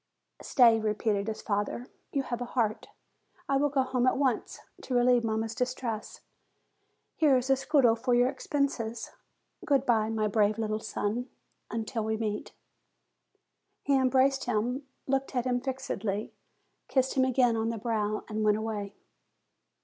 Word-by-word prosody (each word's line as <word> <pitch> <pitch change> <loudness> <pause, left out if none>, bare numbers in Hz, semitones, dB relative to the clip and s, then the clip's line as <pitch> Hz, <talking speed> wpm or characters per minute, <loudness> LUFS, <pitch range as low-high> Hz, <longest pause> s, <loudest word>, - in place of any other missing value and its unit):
"Stay," 235 -4 +5
repeated 210 -1 0
his 220 - -4
father: 205 +3 -2 0.3
"you 275 - 0
have 240 -2 -4
a - - -1
heart. 220 -3 0 0.6
I 275 - +2
will 290 +1 +2
go 270 -1 +2
home 255 -1 0
at - - +3
once, 260 -4 -1 0.2
to 255 - -3
relieve 245 0 +4
mamma's 220 0 -1
distress. 245 -2 -3 1.0
Here 295 -5 +5
is 255 +2 -1
a - - +6
scudo 270 -3 +3
for 245 +1 +1
your 245 +1 +4
expenses. 265 -4 -2 0.5
Good 275 -3 +2
bye, 220 -3 +2
my 220 -1 0
brave 210 0 +2
little 215 -1 -1
son, 220 +3 -3 0.4
until 225 0 -3
we 220 0 -1
meet!" 215 -2 -3 1.3
He 280 - +2
embraced 265 +1 +3
him, 245 +4 -1 0.2
looked 270 0 -1
at 245 -1 0
him 245 -1 0
fixedly, 225 -6 -3 0.5
kissed 260 -1 +1
him 260 - +3
again 250 -2 +3
on 225 0 0
the 230 - -3
brow, 215 -1 -1
and 215 0 -2
went 210 0 +3
away. 210 -2 -4
240 Hz, 150 wpm, -29 LUFS, 220-260 Hz, 1.3 s, a